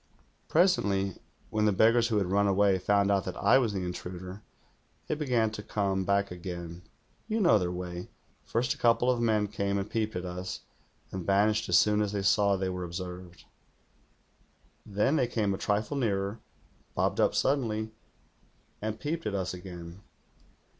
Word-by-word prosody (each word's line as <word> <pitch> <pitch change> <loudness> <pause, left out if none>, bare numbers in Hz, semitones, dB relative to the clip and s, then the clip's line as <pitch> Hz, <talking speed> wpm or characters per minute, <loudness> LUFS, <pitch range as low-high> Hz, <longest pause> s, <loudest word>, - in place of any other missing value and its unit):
"Presently, 100 - +2 0.3
when 105 0 +1
the 105 - +4
beggars 115 +4 +4
who 110 -3 0
had 95 -3 0
run 100 +1 +3
away 100 -1 +3
found 100 +2 +2
out 100 -1 +2
that - - -5
I 115 +6 +5
was 120 -5 +1
the 95 -3 -3
intruder, 90 +2 -6 0.6
they - - -2
began 125 -7 +1
to 110 - -6
come 100 -3 -1
back 100 0 +1
again. 85 -1 -7 0.5
You 220 0 0
know 170 - +5
their 90 -2 -1
way. 90 0 -6 0.3
First 120 +2 0
a - - -16
couple 120 +1 +4
of 120 -2 -1
men 110 -3 +2
came 100 -1 -1
and 100 0 -2
peeped 110 -1 -2
at 90 0 -3
us, 90 +1 -5 0.5
and 95 -2 -4
vanished 105 +4 +2
as - - +6
soon 105 0 +4
as 105 -1 -1
they 100 -1 -1
saw 100 0 +4
they 95 0 -2
were 90 -1 -3
observed. 90 0 -7 1.4
Then 105 +9 +1
they 125 - +2
came 105 -4 0
a - - -3
trifle 105 +7 -1
nearer, 100 -3 -1 0.6
bobbed - - 0
up - - +2
suddenly, 110 -6 0 0.9
and 110 +1 -3
peeped 165 +3 -3
at 100 - -2
us 95 -2 -2
again. 90 0 -9
100 Hz, 170 wpm, -29 LUFS, 95-110 Hz, 1.4 s, as